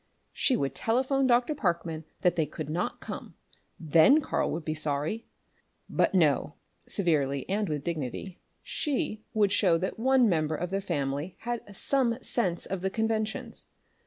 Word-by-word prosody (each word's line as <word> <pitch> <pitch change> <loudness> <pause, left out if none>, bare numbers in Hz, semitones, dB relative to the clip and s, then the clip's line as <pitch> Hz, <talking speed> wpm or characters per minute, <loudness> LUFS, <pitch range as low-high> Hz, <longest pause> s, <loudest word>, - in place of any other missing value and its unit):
She 255 - +2
would 135 -1 -1
telephone 260 - +1
Dr. 245 +4 +3
Parkman 170 - -2 0.2
that 175 -1 +3
they 160 -3 +1
could 155 0 -6
not 175 +3 -2
come. - - -7 0.4
Then 165 - +6
Karl 295 - -1
would 160 -1 -4
be 155 - -1
sorry! 155 +8 -2 0.6
But - - +1
no 150 -4 +3 0.3
severely 140 -8 +1
and 205 0 0
with 150 -2 -2
dignity 165 +3 -4 0.2
she 265 -7 -2
would 205 -2 +3
show 185 -5 +4
that 185 +5 -3
one 260 0 +4
member 155 -4 +1
of 180 +3 -4
the 195 0 0
family 145 0 -2
had 235 -4 -5
some 250 -2 +1
sense 185 -8 0
of 190 -2 -4
the 190 - 0
conventions. 220 0 -2
180 Hz, 155 wpm, -28 LUFS, 155-225 Hz, 0.6 s, Then